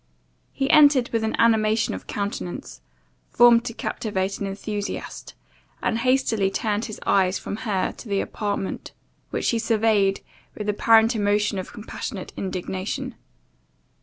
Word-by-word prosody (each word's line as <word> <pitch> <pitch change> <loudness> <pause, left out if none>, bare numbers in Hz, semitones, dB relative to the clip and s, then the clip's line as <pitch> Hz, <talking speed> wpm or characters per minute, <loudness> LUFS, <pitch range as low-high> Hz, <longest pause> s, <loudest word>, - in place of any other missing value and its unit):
He 270 - -1
entered 285 -5 +6
with 230 -1 -1
an 220 - 0
animation 220 -1 +3
of - - -8
countenance, 95 - -5 0.5
formed 235 -1 +6
to 235 - -4
captivate 195 -5 -2
an 200 - -2
enthusiast; 205 +1 -5 0.4
and, 225 - 0
hastily 230 -5 +2
turned 210 +2 -1
his 215 - -7
eyes 185 -1 +3
from 200 - -5
her 210 -5 -1
to 230 - -10
the 200 -1 +1
apartment, 205 -2 -3 0.4
which - - 0
he 230 - 0
surveyed 220 -3 +2 0.4
with 210 - -4
apparent 225 +2 +4
emotions 205 -1 +1
of 185 - -7
compassionate 210 -1 -7
indignation. 185 0 -4
210 Hz, 135 wpm, -24 LUFS, 195-230 Hz, 0.5 s, entered